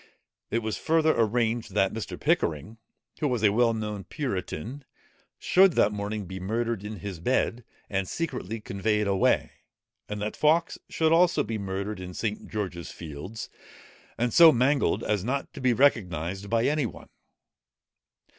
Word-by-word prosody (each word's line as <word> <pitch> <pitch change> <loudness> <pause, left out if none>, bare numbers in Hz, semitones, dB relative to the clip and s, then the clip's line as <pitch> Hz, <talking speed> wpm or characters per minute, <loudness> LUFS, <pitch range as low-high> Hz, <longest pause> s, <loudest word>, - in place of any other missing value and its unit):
It 115 0 -1
was 110 0 -2
further 160 -1 +3
arranged, 115 -1 0
that 95 -2 +2
Mr. 110 -1 -5
Pickering, 85 +9 0 0.4
who 150 - +1
was 125 -5 -1
a 105 - +5
well 115 +2 +3
known 105 -2 -4
puritan, 120 - -4 0.5
should 190 -1 +4
that 105 - +3
morning 105 0 -4
be 95 +2 -7
murdered 115 +2 -2
in 105 -3 -7
his 100 -4 -6
bed, 120 +3 0 0.2
and 95 -1 -2
secretly 125 - -4
conveyed 105 +1 0
away; 100 -1 +2 0.6
and 105 0 -4
that 105 +1 -3
Fawkes 155 +3 +2 0.2
also 165 +2 +4
should - - -4
be 110 0 -3
murdered 100 +1 -4
in 90 -1 -8
St. 105 -2 -3
George's 90 -6 -4
Fields, 85 +7 -7 0.7
and 120 0 0
so 165 -2 +9
mangled, 135 +2 +2
as 105 -3 0
not 135 +5 -2
to - - -8
be 130 -1 +3
recognized 100 - +1
by 115 +1 +2
any 145 -3 +1
one. - - -12
110 Hz, 155 wpm, -27 LUFS, 100-125 Hz, 0.7 s, so